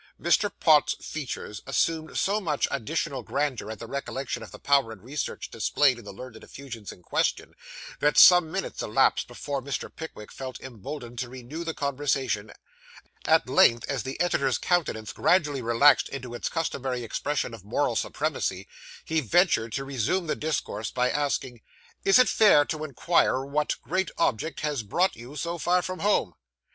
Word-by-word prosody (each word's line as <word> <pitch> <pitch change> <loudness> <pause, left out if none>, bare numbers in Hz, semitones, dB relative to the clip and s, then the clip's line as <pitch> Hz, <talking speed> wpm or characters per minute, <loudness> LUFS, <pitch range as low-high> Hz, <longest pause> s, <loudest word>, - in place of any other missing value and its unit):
Mr. 200 +4 +2
Pott's 155 -3 +4
features 125 -7 -5
assumed 160 +3 0
so 205 +2 +1
much 155 -6 0
additional 135 +1 -2
grandeur 130 -3 -2
at 110 - -6
the 115 - -8
recollection 135 +1 -4
of - - -9
the - - -10
power 140 -5 +2
and 105 -3 -11
research 140 +4 -5
displayed 125 +3 +2
in - - -12
the - - -7
learned 110 +2 -10
effusions 120 -7 -9
in 90 - -15
question, - - -1 0.5
that 150 0 +2
some 175 -3 +8
minutes - - -3
elapsed - - +2
before 140 -1 -4
Mr. 140 +1 -5
Pickwick 160 -10 -9
felt 130 -2 -7
emboldened 120 0 -8
to 125 - -3
renew 130 +6 -7
the 165 -1 -4
conversation; 135 -6 -1 0.7
at - - +4
length, 115 0 +4
as 135 -4 -2
the 130 +7 -6
editor's 175 +1 +1
countenance 110 -12 -1
gradually 150 -5 +2
relaxed 120 +4 +4
into 130 -3 -7
its 120 - -3
customary 135 -6 -2
expression 140 +2 -2
of 110 -5 -10
moral 105 - 0
supremacy, - - -2 0.4
he 160 0 0
ventured 125 - +2
to 135 - -2
resume 140 - -1
the 155 - -1
discourse 110 -9 -3
by 125 0 0
asking 135 -4 -2 0.4
'Is 195 - +6
it 255 - +6
fair 195 -10 +5
to 155 -1 -4
inquire 155 -1 +1
what 150 +2 -1
great 185 +3 -1
object 160 +1 0
has 150 -5 -1
brought 175 - +1
you 120 +5 -11
so 170 +3 -3
far 180 +2 +2
from 185 0 -5
home? 195 - +1
140 Hz, 165 wpm, -26 LUFS, 120-160 Hz, 0.7 s, some